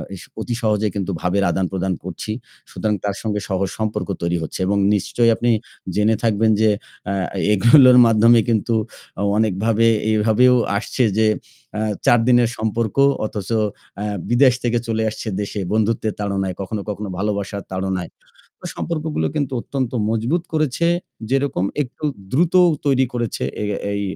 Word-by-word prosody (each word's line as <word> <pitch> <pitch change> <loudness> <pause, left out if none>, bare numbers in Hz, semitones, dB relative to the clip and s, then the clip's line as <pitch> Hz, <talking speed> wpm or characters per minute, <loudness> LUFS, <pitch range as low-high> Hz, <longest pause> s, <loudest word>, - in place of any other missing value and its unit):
S 85 - -11 0.2
অতি 120 +1 -3
সহজে 105 -1 +1
কিন্তু 100 -1 -2
ভাবের 95 +2 +1
আদান 95 - 0
প্রদান 95 0 -1
করছি। 95 +4 -6 0.4
সুতরাং 105 -1 -1
তার 100 -1 -1
সঙ্গে 105 -2 -2
সহজ 95 0 0
সম্পর্ক 110 -1 -2
তৈরি 85 0 0
হচ্ছে 80 - -6
এবং 100 0 +1 0.2
নিশ্চয়ই 115 +4 +2
আপনি 120 +1 +1 0.4
জেনে 105 +2 +3
থাকবেন 110 0 +2
যে 110 - +5 0.4
আ - - 0 0.4
এগুলোর 125 +4 +7
মাধ্যমে 115 +1 +5
কিন্তু 115 +1 +1 0.5
অ - - 0
অনেকভাবে 110 +2 +1 0.3
এভাবেও 110 +4 +4 0.2
আসছে 125 +4 -1
যে 110 -1 +4 0.5
আ - - -1 0.3
৪ 120 - +5
দিনের 120 -2 +4
সম্পর্ক 110 0 -2 0.3
অথচ 105 -1 -5 0.5
আ - - -2 0.3
বিদেশ 125 +1 +5
থেকে 120 -1 +1
চলে 110 -1 0
আসছে 110 - -7
দেশে 105 0 -4
বন্ধুত্বের 110 0 0
তাড়নায়, 95 -3 -2
কখনো, 100 +2 -4
কখনো 105 -1 -4
ভালোবাসার 100 -1 -3
তাড়নায়। 95 -2 -3 0.5
তো - - -10
সম্পর্কগুলো 155 - -2
কিন্তু 145 -3 -1
অত্যন্ত 130 -4 -3 0.2
মজবুত 120 +10 0
করেছে, 155 +1 +1 0.4
যেরকম 135 -8 0 0.2
একটু 130 +3 -8 0.3
দ্রুতও 175 +5 +4 0.2
তৈরি 130 -2 +3
করেছে 120 - -3 0.2
এ - - -1 0.3
এই 100 - -2
110 Hz, 150 wpm, -20 LUFS, 100-120 Hz, 0.5 s, এগুলোর